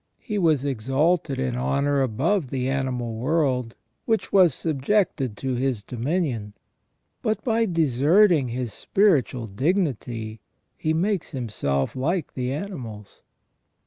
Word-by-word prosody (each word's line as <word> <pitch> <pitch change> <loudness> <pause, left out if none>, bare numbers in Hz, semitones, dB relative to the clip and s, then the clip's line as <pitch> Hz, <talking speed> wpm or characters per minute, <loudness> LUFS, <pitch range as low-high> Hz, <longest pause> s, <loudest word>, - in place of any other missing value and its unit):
He 210 -4 -3
was 155 -6 +2
exalted 135 +4 0
in 130 -2 -1
honour 140 +3 +1
above 135 - 0
the 130 -1 -2
animal 125 -4 -2
world, 130 -3 0 0.3
which 225 -2 0
was 185 -4 +6
subjected 140 - 0
to 130 -1 -2
his 125 -4 -1
dominion, 125 - -2 0.7
but 215 -1 -1
by 225 -2 +2
deserting 160 - +4
his 120 -1 -4
spiritual 150 - +2
dignity 120 - -2 0.3
he 155 - -1
makes 180 +2 0
himself 85 - -2
like 160 +7 -1
the 125 -1 -2
animals. 130 - -7
135 Hz, 115 wpm, -24 LUFS, 125-170 Hz, 0.7 s, was